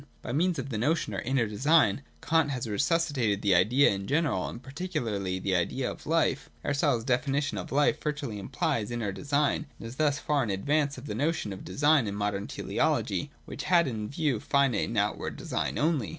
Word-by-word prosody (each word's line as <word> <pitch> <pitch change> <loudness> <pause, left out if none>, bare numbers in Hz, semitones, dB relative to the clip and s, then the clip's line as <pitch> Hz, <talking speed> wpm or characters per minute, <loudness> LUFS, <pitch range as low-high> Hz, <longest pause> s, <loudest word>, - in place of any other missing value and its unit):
By - - -4
means 170 +6 +1
of 135 0 -4
the 110 -5 -3
notion 155 +6 0
of - - -2
Inner 130 -3 +1
Design 125 +1 +3 0.2
Kant 160 -2 +2
has 130 -2 -3
resusci 145 +10 +1
tated 110 -8 0
the 100 -2 +4
Idea 115 +11 +5
in 100 -1 -4
general 140 - +1
and - - -8
particularly 125 - -3
the 95 +1 -1
idea 125 +9 0
of - - -11
life. 160 -4 +1
Aristotle's 140 -5 +1
definition 140 +3 0
of - - -7
life 145 +2 +2
virtually 145 -8 -3
implies 105 +2 -1
inner 120 -4 -2
design, 145 +6 0
and - - -8
is 120 +3 -9
thus 150 -2 +2
far 145 0 0
in 115 - -3
advance 140 +9 0
of 130 - -9
the 105 - -4
notion 135 -4 -1
of 95 - -9
design 145 -4 +3
in 100 - -3
modern 100 -1 -2
Teleology, - - -1 0.2
which - - -6
had 170 -3 +4
in 110 -4 -4
view 140 -5 0
finite 135 -4 +2
and 115 - -4
out 105 +1 +1
ward - - -5
design - - -2
only. 150 -7 +1
135 Hz, 200 wpm, -28 LUFS, 105-150 Hz, 0.2 s, Idea